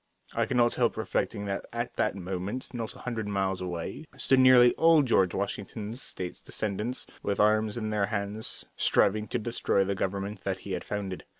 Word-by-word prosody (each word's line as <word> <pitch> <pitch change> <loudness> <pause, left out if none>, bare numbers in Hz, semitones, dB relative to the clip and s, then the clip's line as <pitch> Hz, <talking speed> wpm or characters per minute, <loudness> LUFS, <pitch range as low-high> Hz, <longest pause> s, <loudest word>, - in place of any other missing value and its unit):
I - - +1
could 125 - 0
not 120 -1 +4
help 120 -3 +1
reflecting 110 -1 -1
that 100 -1 -3
at 120 +1 -3
that - - 0
moment 95 +7 -4
not 115 -2 -4
a - - -12
hundred 115 -4 -3
miles 95 -2 -1
away 90 - -4
stood 135 - +3
nearly 125 -1 +7
all 165 -2 +5
George 95 -8 +3
Washington's 105 +4 -4
State's 90 -7 -5
descendants, 110 +4 -3 0.2
with 100 - -1
arms 110 +1 +3
in 110 -2 -2
their 105 -2 +1
hands, 105 +1 -3
striving 105 +2 +2
to - - -1
destroy 110 -3 +1
the 100 +1 -1
government 100 +1 -3
that - - -2
he - - -5
had - - -2
founded. 100 -3 -4
105 Hz, 185 wpm, -29 LUFS, 100-120 Hz, 0.2 s, nearly